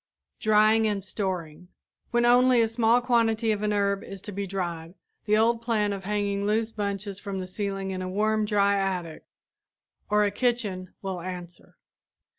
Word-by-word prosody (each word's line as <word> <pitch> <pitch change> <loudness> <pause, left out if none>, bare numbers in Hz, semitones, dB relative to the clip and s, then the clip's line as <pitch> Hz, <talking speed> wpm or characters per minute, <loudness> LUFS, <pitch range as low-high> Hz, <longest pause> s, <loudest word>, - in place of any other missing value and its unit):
DRYING 215 +1 +4
AND 205 -2 -2
STORING 180 -4 -4 0.4
When 240 0 +2
only 250 +1 +5
a 225 - +4
small 230 +1 +3
quantity 230 -2 +2
of 210 -1 -1
an 210 0 0
herb 200 -1 0
is 195 - -8
to 210 - -6
be 200 0 -4
dried, 175 -3 -4 0.3
the 215 -1 +3
old 230 +1 +2
plan 215 -3 0
of 195 -1 -7
hanging 200 -1 -1
loose 220 +1 +1
bunches 200 -2 -4
from 200 -2 -5
the 185 - -4
ceiling 195 0 -4
of 185 - -4
a 185 - -3
warm, 215 +3 +1
dry 200 -1 +2
attic 180 -5 -3 0.8
or 210 0 +3
a 205 - 0
kitchen 205 -6 -2
will 190 -2 -4
answer. 175 -1 -9
205 Hz, 170 wpm, -26 LUFS, 190-220 Hz, 0.8 s, only